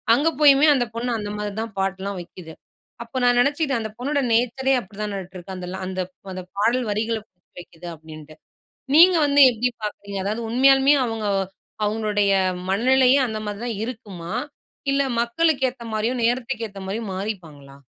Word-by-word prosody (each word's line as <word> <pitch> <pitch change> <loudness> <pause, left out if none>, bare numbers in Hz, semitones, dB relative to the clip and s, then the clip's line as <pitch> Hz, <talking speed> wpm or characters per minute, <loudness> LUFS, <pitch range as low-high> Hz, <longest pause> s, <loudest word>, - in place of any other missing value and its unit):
அங்க 295 +6 +2
போயுமே 285 0 +7
அந்தப் 245 -4 -2
பொண்ணு 240 +2 -2
அந்த 205 -1 -5
மாரிதான் 210 +1 -4
பாட்டு 190 0 -1
எல்லாம் 200 -1 -4
வைக்குது. 170 -1 -11 0.5
அப்ப 235 +3 -5
நான் 245 0 +4
நினைச்சுக்கிட்டேன் 280 0 +1
அந்தப் 220 -1 -6
பொண்ணோட 285 +4 -1
நேச்சரயே 250 +3 +2
அப்பிடித்தானாட்டுருக்கு. 195 -3 -7
அந்த 180 -1 -7
ல - - -5
அந்த, 185 0 -3 0.3
அந்தப் 185 -1 -8
பாடல் 235 +4 +2
வரிகள 220 +2 -1 0.4
வைக்குது 175 0 -12
அப்பிடின்னு. 155 -1 -12 0.6
நீங்க 350 +3 +8
வந்து 285 0 +4
எப்பிடி 245 +1 0
பார்க்குறீங்க? 200 -1 -5
அதாவது 215 +4 -2
உண்மையாலுமே 270 +3 +5
அவுங்க, 225 -2 -3 0.6
அவுங்களுடைய 210 -1 +1 0.4
மனநிலையும் 260 +6 +4
அந்தமாரிதான் 215 +1 -4
இருக்குமா? 200 -8 -7 0.6
இல்ல 275 0 +2 0.2
மக்களுக்கு 265 +2 +1
ஏத்த 245 -1 -13
மாரியும் 230 +3 -1
நேரத்துக்கு 230 -1 -1
ஏத்த 200 -1 -11
மாரியும் 210 +1 -4
மாறிப்பாங்களா? 165 -9 -7
220 Hz, 145 wpm, -23 LUFS, 195-250 Hz, 0.6 s, நீங்க